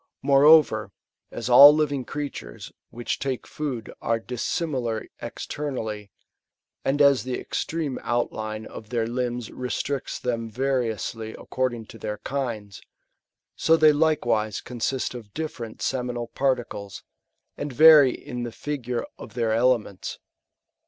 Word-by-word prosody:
Moreover, 140 -6 +5 0.4
as - - -5
all 140 +4 +10
living 145 -4 0
crea 145 +1 -4
tures, - - -9 0.2
which 120 0 -4
take 130 -2 -3
food, 135 -7 -5
are 115 0 +1
dissimilar 125 -1 -2 0.2
externally, 115 -4 -5 0.7
and 140 +2 0
as 140 -2 +5
the 125 0 -3
extreme 155 -5 -3
outline 110 -2 -2
of 110 - -10
their 115 -1 0
limbs 120 -1 -3
restricts 130 +2 -3
them 115 -2 -3
variously 115 -3 -2
accord 130 -1 -2
ing 115 -1 -9
to 115 - -13
their 105 -1 -4
kinds, 115 -8 -4 0.7
so 165 0 +4
th^y 155 -1 +6
likewise 120 -9 +1
consist 125 +2 -3
of 110 -5 -10
different 125 -8 -5
seminal 125 -2 -2
particles, 120 -7 -2 0.5
and 145 0 -5
vary 150 0 +8
in 125 0 -7
the 120 -1 -4
figure 125 -2 -4
of - - -11
their 115 -2 +1
elements. 115 -5 0
125 Hz, 125 wpm, -25 LUFS, 115-140 Hz, 0.7 s, all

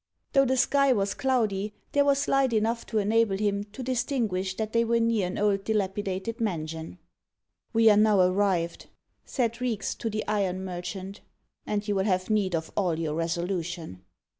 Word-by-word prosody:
Though 275 -1 +5
the 260 0 +1
sky 275 +2 +3
was 200 -3 0
cloudy, 215 -6 0 0.2
there 285 - +4
was 280 0 +2
light 270 -3 +2
enough 225 +2 0
to 220 - -2
enable 215 -1 +2
him 205 0 0
to 215 +5 -9
distinguish 235 -7 -1
that 220 +1 -3
they 230 0 +3
were 235 0 +2
near 230 -5 +1
an 180 - -5
old 200 -1 +1
dilapidated 205 +1 -2
mansion. 160 -4 -3 0.7
"We 225 -1 +4
are 205 - +4
now 210 -2 +4
arrived," 180 -2 +1 0.4
said 235 -2 -1
Reeks 235 -5 -1
to 230 - -4
the 215 0 -3
iron 190 -3 -1
merchant, 185 +2 -6 0.5
"and 205 0 -2
you 205 - +1
will 190 -1 0
have 185 0 0
need 195 -4 +1
of 160 0 -4
all 180 -5 +1
your 155 -2 -2
resolution." 170 - -3
205 Hz, 170 wpm, -27 LUFS, 185-230 Hz, 0.7 s, Though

